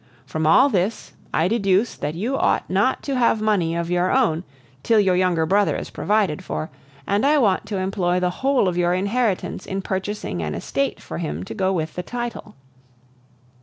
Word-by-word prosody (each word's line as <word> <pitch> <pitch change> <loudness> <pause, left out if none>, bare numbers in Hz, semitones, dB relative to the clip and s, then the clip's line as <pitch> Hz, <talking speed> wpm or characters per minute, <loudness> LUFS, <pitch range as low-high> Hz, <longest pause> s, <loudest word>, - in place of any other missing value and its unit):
From 155 0 -2
all 255 - +6
this 205 -3 -1 0.2
I 160 - +2
deduce 200 0 +1
that 150 +2 -4
you 230 +10 -2
ought - - +1
not 200 +8 +1
to 275 - -2
have 235 -3 +3
money 200 -6 +1
of 170 0 -2
your 180 +1 +2
own 195 -11 +2 0.4
till 225 -2 +3
your 190 -3 +3
younger 180 -3 +2
brother 200 +4 +2
is - - -7
provided 205 -7 0
for, 155 - -4 0.3
and 200 +2 +1
I 295 +2 +4
want 205 -9 +2
to 205 - -3
employ 185 -1 0
the 180 0 0
whole 270 -6 +3
of 180 - 0
your 175 0 +2
inheritance 200 0 -1
in 195 0 -3
purchasing 190 - -3
an 75 -1 -3
estate - - -2
for - - -6
him 75 +4 -4
to - - -7
go 190 0 0
with 160 -4 -2
the 180 - -4
title." 240 +2 -6
190 Hz, 190 wpm, -22 LUFS, 175-220 Hz, 0.4 s, all